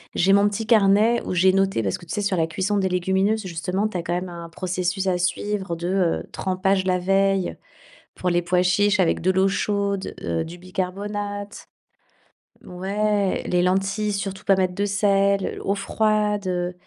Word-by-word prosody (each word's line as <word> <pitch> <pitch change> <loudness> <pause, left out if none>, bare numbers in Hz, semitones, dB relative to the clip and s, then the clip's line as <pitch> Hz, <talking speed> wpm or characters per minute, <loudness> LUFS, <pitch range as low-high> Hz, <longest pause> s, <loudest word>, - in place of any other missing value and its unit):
J'ai 195 +2 +3
mon 200 +1 +5
petit 215 +2 -4
carnet 215 +1 +4
où - - -3
j'ai 185 +1 +4
noté, 195 -9 +1
parce 95 -2 -1
que, - - -14
tu - - -7
sais, 210 - -1
sur 200 -3 0
la 160 - +2
cuisson 190 +5 -1
des 190 -1 +1
légumineuses, 190 +4 0
justement, 180 +5 -2
tu 190 - -5
as 170 - -3
quand 170 - -2
même 180 +1 -3
un 170 -1 -8
processus 185 +2 -2
à 180 -1 +2
suivre 190 +1 -2
de, 170 +1 -4
heu, 185 -3 0
trempage 190 0 0
la 180 -1 +1
veille. 195 0 +1 0.6
Pour 185 - -1
les 175 0 +2
pois 180 +1 +2
chiches, 205 +3 +2
avec 175 - +2
de 180 - +1
l'eau 190 +1 +3
chaude, 200 0 -1
heu, 165 - -1
du 170 +2 -9
bicarbonate. 205 +3 -5 1.0
Ouais, 200 +2 -1
les 180 0 +2
lentilles, 195 +3 0
surtout 195 -1 -4
pas 195 - +5
mettre 185 -1 0
de 200 +2 0
sel, 200 -1 +1
eau 200 - 0
froide, 210 -1 0
heu, 180 0 -1
195 Hz, 185 wpm, -23 LUFS, 180-205 Hz, 1.0 s, mon